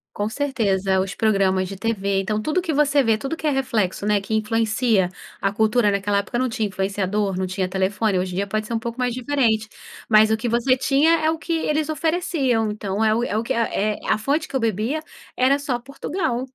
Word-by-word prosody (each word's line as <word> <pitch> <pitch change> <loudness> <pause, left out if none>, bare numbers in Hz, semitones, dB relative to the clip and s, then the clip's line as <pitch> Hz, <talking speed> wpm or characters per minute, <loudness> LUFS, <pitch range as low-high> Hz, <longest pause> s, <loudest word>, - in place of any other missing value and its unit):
Com 205 +1 -1
certeza. 220 -8 -1
É, 190 - +3
os 190 +1 -2
programas 195 -3 +1
de 195 - -7
tv, 200 -3 -1
então 215 +2 -2
tudo 310 +9 0
que 330 -4 -2
você 290 0 +3
vê, 225 -3 +2
tudo 275 +8 -4
que 310 - -3
é - - +4
reflexo, 230 -8 -1
né, 210 -1 +3
que 200 +3 -6
influencia 220 -2 +1 0.3
a 195 0 0
cultura, 220 +1 +2
naquela 200 0 0
época 205 +4 -2
não 255 0 0
tinha 220 -1 -1
influenciador, 195 0 -1
não 185 0 -1
tinha 185 0 -2
telefone, 190 +1 0
hoje 180 0 -3
em - - -5
dia 200 +1 -1
pode 215 +1 -2
ser 235 - -4
um 225 - 0
pouco 235 +1 -6
mais 250 -1 0
diferente, 235 -5 0 0.4
mas 215 0 +6
o 220 - +3
que 230 +2 -3
você 240 +3 +3
tinha 280 +5 +3
é 315 +1 +2
o 325 - -3
que 335 +1 -4
eles 310 -1 0
ofereciam, 310 -8 0
então 210 0 -2
é 215 0 +3
o 235 - 0
é 215 - -1
o 225 - 0
que - - -1
é 215 -2 0
a 215 - +3
fonte 285 +8 -1
que - - -7
eu - - +2
bebia 225 +7 -1 0.4
era 265 +2 +4
só 275 -4 -2
Portugal. 275 -1 -3
220 Hz, 230 wpm, -22 LUFS, 200-265 Hz, 0.4 s, mas